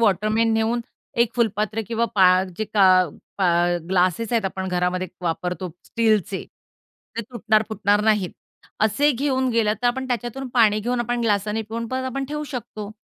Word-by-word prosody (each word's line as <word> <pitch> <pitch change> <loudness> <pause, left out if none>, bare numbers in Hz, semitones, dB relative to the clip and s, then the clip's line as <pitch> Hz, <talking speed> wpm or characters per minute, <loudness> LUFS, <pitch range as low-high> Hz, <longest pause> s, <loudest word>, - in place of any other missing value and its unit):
Waterman 215 +2 +2
नेऊन 225 +2 +1 0.4
एक 235 0 +2
फुलपात्र 215 -1 0
किंवा 230 0 0
पा 190 -2 +6 0.3
जे 215 - -1
का 185 -4 +4 0.3
पा 190 - +3 0.4
ग्लासेस 185 +5 +1
आहेत 225 -4 +1
आपण 190 0 -3
घरामध्ये 180 +1 0 0.2
वापरतो 180 +1 -2 0.2
स्टीलचे. 215 -4 0 0.7
ते - - 0
तुटणार, 220 -3 +2
फुटणार 205 -1 +1
नाहीत, 210 -5 +2 0.5
असे 220 +8 +3
घेऊन 260 0 0
गेलं 225 -3 +2
तर - - +3
आपण 260 +2 0
त्याच्यातून 245 +2 -3
पाणी 215 -3 +4
घेऊन, 245 +2 -1
आपण 240 0 -1
ग्लासाने 210 0 0
पिऊन, 230 +2 -5
परत 260 +1 -2
आपण 270 +1 -3
ठेवू 300 0 -3
शकतो. 225 -6 -6
220 Hz, 155 wpm, -23 LUFS, 200-240 Hz, 0.7 s, पा